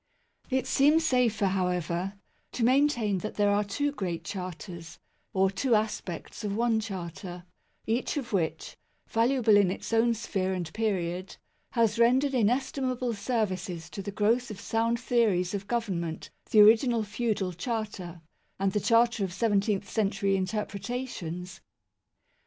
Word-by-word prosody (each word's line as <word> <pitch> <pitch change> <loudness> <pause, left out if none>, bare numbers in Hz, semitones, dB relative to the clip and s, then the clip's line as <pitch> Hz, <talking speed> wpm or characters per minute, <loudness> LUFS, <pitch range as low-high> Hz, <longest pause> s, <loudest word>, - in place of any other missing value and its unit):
It 260 -1 0
seems 305 +4 +4
safer, 245 -7 +2
however, 180 -1 -1 0.4
to 240 - -1
maintain 245 -7 +3
that 215 - -5
there 205 -1 +3
are 205 +1 +2
two 285 +9 -1
Great 185 - -4
Charters 180 -3 -7 0.3
(or 190 0 +2
two 235 +4 +2
aspects 210 -6 -3
of 200 -1 -2
one 230 0 +2
charter) 180 -3 -6 0.4
each 235 +6 -1
of 250 -6 -4
which, 170 -5 -1 0.3
valuable 230 -1 +3
in 200 -3 +5
its 195 - -5
own 230 +1 +3
sphere 190 -4 -2
and 175 -3 -4
period, 185 -4 -2 0.4
has 230 -2 +2
rendered 260 +4 +4
inestimable 255 +1 0
services 190 -7 -2
to 200 - -5
the 195 - -5
growth 225 +5 +1
of 210 -2 -7
sound 230 +2 0
theories 210 -8 +1
of 200 0 -4
Government 185 -9 -3 0.2
the 215 - +7
original 225 +2 +5
feudal 210 -3 -2
charter, 190 -4 -4 0.4
and 195 0 +1
the 210 - 0
charter 230 0 +3
of 190 - -2
seventeenth 205 0 +1
century 200 -2 0
inter 190 +3 -1
pretations. 195 -6 -6
210 Hz, 140 wpm, -28 LUFS, 185-235 Hz, 0.4 s, the